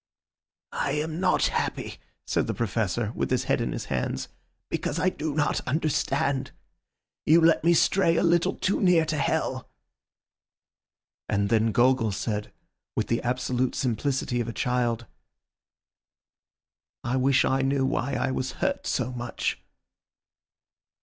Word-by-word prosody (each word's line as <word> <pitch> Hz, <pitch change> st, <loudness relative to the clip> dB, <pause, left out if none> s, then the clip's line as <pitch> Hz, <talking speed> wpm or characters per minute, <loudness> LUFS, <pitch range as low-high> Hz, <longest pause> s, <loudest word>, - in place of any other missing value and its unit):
"I 140 Hz, -, -1 dB
am 155 Hz, +2 st, -2 dB
not 190 Hz, -, +3 dB
happy," -, -, -3 dB, 0.3 s
said -, -, 0 dB
the -, -, -2 dB
Professor 110 Hz, 0 st, -1 dB
with -, -, -2 dB
his 130 Hz, -1 st, +1 dB
head -, -, +1 dB
in -, -, -1 dB
his -, -, -4 dB
hands, -, -, -2 dB, 0.4 s
"because 145 Hz, -, -2 dB
I 185 Hz, +3 st, +2 dB
do 155 Hz, -4 st, -4 dB
not 150 Hz, -1 st, +1 dB
understand. 140 Hz, -2 st, 0 dB, 0.8 s
You 160 Hz, +2 st, +7 dB
let 165 Hz, -1 st, +4 dB
me 170 Hz, +1 st, +5 dB
stray 170 Hz, 0 st, +3 dB
a -, -, +2 dB
little 170 Hz, 0 st, +2 dB
too 190 Hz, -, 0 dB
near 180 Hz, -4 st, +4 dB
to 155 Hz, -1 st, -2 dB
hell." 140 Hz, -, -1 dB, 1.6 s
And 100 Hz, -1 st, +1 dB
then 110 Hz, 0 st, +3 dB
Gogol 120 Hz, -3 st, +3 dB
said, 105 Hz, +1 st, -3 dB, 0.4 s
with -, -, -1 dB
the 115 Hz, -, +1 dB
absolute 125 Hz, 0 st, -1 dB
simplicity 125 Hz, 0 st, -1 dB
of 115 Hz, -, -4 dB
a 115 Hz, -, -4 dB
child— 120 Hz, -2 st, 0 dB, 2.0 s
"I 120 Hz, -, -1 dB
wish 135 Hz, +1 st, +3 dB
I 135 Hz, 0 st, +1 dB
knew 135 Hz, 0 st, +1 dB
why 135 Hz, 0 st, -1 dB
I 130 Hz, -, 0 dB
was 130 Hz, 0 st, -2 dB
hurt -, -, -2 dB
so 125 Hz, -, -1 dB
much." 120 Hz, -1 st, -3 dB
130 Hz, 140 wpm, -26 LUFS, 120-155 Hz, 2.0 s, You